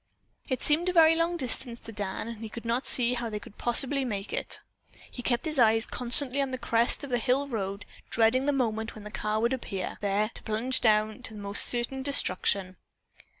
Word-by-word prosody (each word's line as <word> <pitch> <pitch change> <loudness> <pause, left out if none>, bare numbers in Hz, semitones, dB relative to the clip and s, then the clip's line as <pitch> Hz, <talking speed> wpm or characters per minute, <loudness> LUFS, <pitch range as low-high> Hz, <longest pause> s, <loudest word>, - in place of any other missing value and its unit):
It 260 -2 -1
seemed 325 +4 +2
a - - -2
very 325 -2 +6
long 335 +1 0
distance 250 -3 -1
to - - -9
Dan 205 0 -5
and 230 -1 -7
he 225 -1 -7
could 235 +2 -9
not 235 +3 -1
see 245 -1 +6
how 235 -1 -3
they 210 - -4
possibly 245 +7 -1
could 265 - -2
make 200 -3 -5
it. - - -2 0.5
He 245 - -7
kept 240 +2 -1
his 310 -3 0
eyes 225 -1 +4
constantly 255 +2 +4
on 275 - -2
the 260 - -4
crest 235 +2 +2
of 280 - -7
the 245 - +1
hill 265 +4 0
road, 200 -5 -5 0.2
dreading 235 +4 +2
the - - +3
moment 225 -5 -2
when 215 - -11
the 210 - -9
car 215 +1 -2
would 235 +3 0
appear, 195 -7 -5
there 205 +1 0
to - - -3
plunge 235 +4 -2
down 215 0 +2
to 205 -4 -7
certain 240 +5 +1
destruction. 190 -8 +1
235 Hz, 205 wpm, -27 LUFS, 215-265 Hz, 0.5 s, very